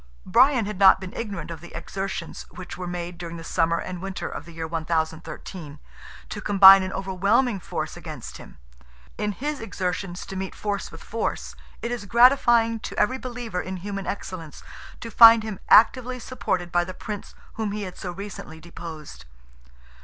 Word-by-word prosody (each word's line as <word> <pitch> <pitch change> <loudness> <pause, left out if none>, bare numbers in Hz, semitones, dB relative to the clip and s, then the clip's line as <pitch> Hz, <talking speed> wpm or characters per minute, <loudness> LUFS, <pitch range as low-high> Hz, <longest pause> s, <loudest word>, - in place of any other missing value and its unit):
Brian 245 +3 +4
had 205 -2 -5
not 195 -1 +7
been 185 -1 -8
ignorant 195 -8 -5
of 165 -2 -7
the 175 - -11
exertions 195 -3 -5
which 180 +2 -9
were 180 0 -6
made 175 0 -5
during 170 -1 -6
the 165 - -9
summer 165 0 +1
and 180 0 -5
winter 195 0 -4
of - - -7
the 170 - -12
year 165 0 -5
1013, 160 0 -4 0.5
to 205 - -6
combine 195 -1 +9
an 185 0 -3
overwhelming 195 +5 +1
force - - -5
against - - -8
him. - - -14 0.6
In 210 0 0
his 290 +8 -4
exertions 180 -3 -4
to 195 - -8
meet 190 0 -5
force 205 -2 -3
with 165 - -12
force, 230 - -3 0.3
it 235 - -2
is 240 -4 -4
gratifying 235 -1 +5
to - - -7
every 255 +5 +1
believer 240 -7 -4
in 185 0 -5
human 195 0 -5
excellence 175 -6 -6 0.4
to 230 - -7
find 230 0 +9
him 215 -4 -5
actively 250 +3 +5
supported 185 -8 -3
by 175 +1 +3
the 185 +1 -8
Prince 210 -2 -7 0.2
whom 220 -2 -3
he 210 0 -4
had 185 -2 -7
so 180 - -6
recently 175 -4 -8
deposed. 155 - -10
190 Hz, 175 wpm, -24 LUFS, 175-220 Hz, 0.6 s, combine